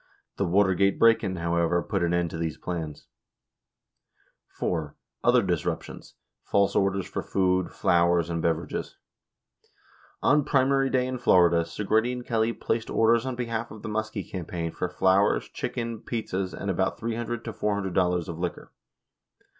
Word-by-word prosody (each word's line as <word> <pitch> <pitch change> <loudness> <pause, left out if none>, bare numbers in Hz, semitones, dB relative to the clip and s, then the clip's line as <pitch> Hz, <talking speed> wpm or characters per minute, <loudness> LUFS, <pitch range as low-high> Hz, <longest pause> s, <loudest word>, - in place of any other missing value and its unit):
The 100 - 0
Watergate 95 +1 +3
break 115 0 +5
in, 95 -2 -2
however, 85 0 +1
put 100 -3 -2
an 85 0 +1
end 85 -1 0
to - - -5
these 80 -2 -2
plans. 80 -4 -5 1.5
(iv) 80 -4 -2 0.3
Other 120 -1 +5
Disruptions. 90 -4 -3 0.2
— - - -59
False 100 0 +3
Orders 95 -1 +1
for - - -4
Food, 95 -1 +1
Flowers, 85 -1 +2
and 85 -1 -2
Beverages. 85 0 -2 0.6
— - - -29
On 150 +1 +4
primary 135 0 +2
day 130 -1 +1
in 130 -1 -4
Florida, 85 -6 +5
Segretti 110 +7 0
and 125 -1 -6
Kelly 115 -1 +1
placed 115 0 -2
orders 115 +2 +3
on 130 - -2
behalf 115 -1 -3
of 110 -1 -11
the - - -4
Muskie 110 -2 -3
campaign 85 -2 -4
for 90 - -3
flowers, 95 +2 +2
chicken, 115 -2 -4
pizzas, 100 -7 -3
and 100 - -3
about 95 +1 0
$300 115 0 -3
$400 95 -5 0
of 85 -1 -6
liquor. 90 -2 -4
95 Hz, 150 wpm, -26 LUFS, 85-115 Hz, 1.5 s, break